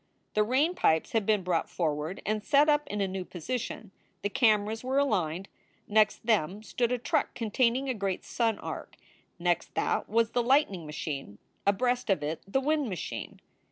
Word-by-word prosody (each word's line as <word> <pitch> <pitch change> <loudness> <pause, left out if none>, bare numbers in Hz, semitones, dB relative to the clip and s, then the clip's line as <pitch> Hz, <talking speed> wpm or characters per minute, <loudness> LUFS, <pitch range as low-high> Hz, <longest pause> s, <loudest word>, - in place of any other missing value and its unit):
The 215 - +3
rain 270 +10 +2
pipes 160 - +2
had 220 -3 0
been 210 -3 +3
brought 175 -2 0
forward 155 +1 -2
and 215 0 -1
set 290 +4 +4
up 295 -1 +3
in 210 -4 -3
a 195 - +1
new 190 0 -4
position. 210 +4 -5 0.3
The 205 - +1
cameras 220 -1 +2
were 260 +2 0
aligned. 195 - +1 0.4
Next 215 +1 +3
them 210 -2 +1
stood 240 +2 -1
a 250 - +1
truck 240 - 0
containing 240 +3 +1
a 260 - +1
great 195 -4 -3
sun 225 -3 0
arc. - - -7 0.4
Next 175 0 0
that - - 0
was 230 +1 +2
the 245 - +2
light 270 +2 +4
ning 175 -5 -7
machine, 140 -8 -5 0.3
abreast 245 +4 +1
of 185 -7 +2
it 155 +2 -3
the 230 +7 +1
wind 295 -1 +1
machine. 185 - -5
215 Hz, 180 wpm, -29 LUFS, 185-250 Hz, 0.4 s, set